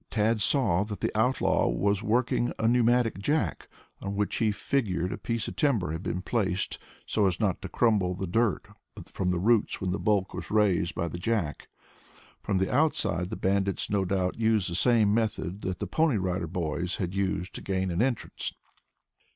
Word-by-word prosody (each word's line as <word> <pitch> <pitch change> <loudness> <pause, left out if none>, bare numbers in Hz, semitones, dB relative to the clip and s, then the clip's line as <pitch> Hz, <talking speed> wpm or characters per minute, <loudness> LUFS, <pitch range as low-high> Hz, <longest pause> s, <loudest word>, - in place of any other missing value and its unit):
Tad 110 0 +1
saw 105 -5 +2
that 105 -1 -6
the - - -2
outlaw 125 +5 +2
was 100 +11 +1
working 120 +2 +1
a 110 +1 +1
pneumatic 120 -2 +3
jack, 105 - -1 0.3
on 100 0 -4
which 105 0 -1
he 110 -3 +2
figured 100 -7 -1
a - - -5
piece 115 -2 -2
of - - -6
timber 115 - +1
had 80 +2 -4
been 90 0 -3
placed 100 -4 -1 0.3
so 105 -2 +2
as 90 -3 -1
not 100 -5 0
to 95 - -6
crumble 100 -6 +2
the 95 - -3
dirt 110 +3 0 0.4
from 90 - -2
the 90 - +1
roots 110 +4 +2
when 95 -1 -2
the 95 - -2
bulk 100 -3 +1
was - - -6
raised 100 -5 +2
by 85 - -1
the 85 - -6
jack. 90 -6 -2 0.7
From 100 - 0
the 95 +4 0
outside 125 - +1
the - - -4
bandits 100 0 0
no 100 -2 +2
doubt 95 +1 -1
used 110 -5 +2
the - - -2
same 110 -1 +4
method 105 -4 -1
that 90 -1 -3
the - - -3
Pony 160 -7 +2
Rider 90 -2 -1
Boys 85 +1 -2
had 90 -1 -3
used 95 -1 -1
to - - -7
gain 95 -1 -1
an 85 - 0
entrance. 125 -2 -2
100 Hz, 190 wpm, -28 LUFS, 90-115 Hz, 0.7 s, same